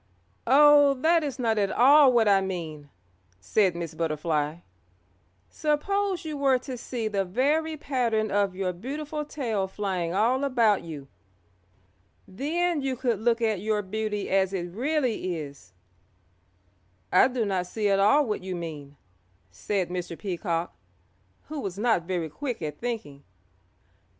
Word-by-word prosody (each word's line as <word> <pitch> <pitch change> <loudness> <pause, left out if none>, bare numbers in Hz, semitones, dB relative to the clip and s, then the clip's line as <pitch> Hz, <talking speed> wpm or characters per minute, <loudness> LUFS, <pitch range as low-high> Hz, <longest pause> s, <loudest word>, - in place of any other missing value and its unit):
"Oh, 290 +1 +6
that 325 +5 +2
is 285 -3 -4
not 225 -4 0
at 200 -1 +1
all 275 +2 +6
what 235 -3 +3
I 195 -1 +5
mean," 160 -6 -5 0.5
said 180 - +1
Miss 170 -2 -5
Butterfly. 155 -1 -1 0.9
"Suppose 370 +5 -1
you 305 -2 -4
were 270 -2 +3
to 255 +1 -7
see 235 -2 -4
the 200 -2 0
very 295 - 0
pattern 235 -7 -1
of 200 -2 +1
your 185 -1 -2
beautiful 295 - -5
tail 230 -10 -2
flying 190 -4 -3
all 235 +8 +1
about 235 -7 +2
you. 150 -5 -8 1.2
Then 315 - -1
you 270 -1 -1
could 240 -4 -1
look 230 +1 +1
at 215 -4 +1
your 210 +1 -1
beauty 210 +1 -3
as 190 0 +2
it 175 -2 -3
really 245 - -1
is." 140 - -9 1.4
"I 185 - +6
do 250 -3 -2
not 185 -3 -1
see 210 +3 -1
at 195 -1 +2
all 280 +9 +4
what 215 -5 -3
you 185 -1 -4
mean," 150 -4 -7 0.5
said 190 - -2
Mr. 175 -2 -5
Peacock, 175 -3 -3 0.7
who 305 -1 -7
was 195 -7 -5
not 215 -6 +1
very 175 -3 -2
quick 245 - -5
at 150 -1 -5
thinking. 210 -13 -5
215 Hz, 145 wpm, -26 LUFS, 180-265 Hz, 1.4 s, Oh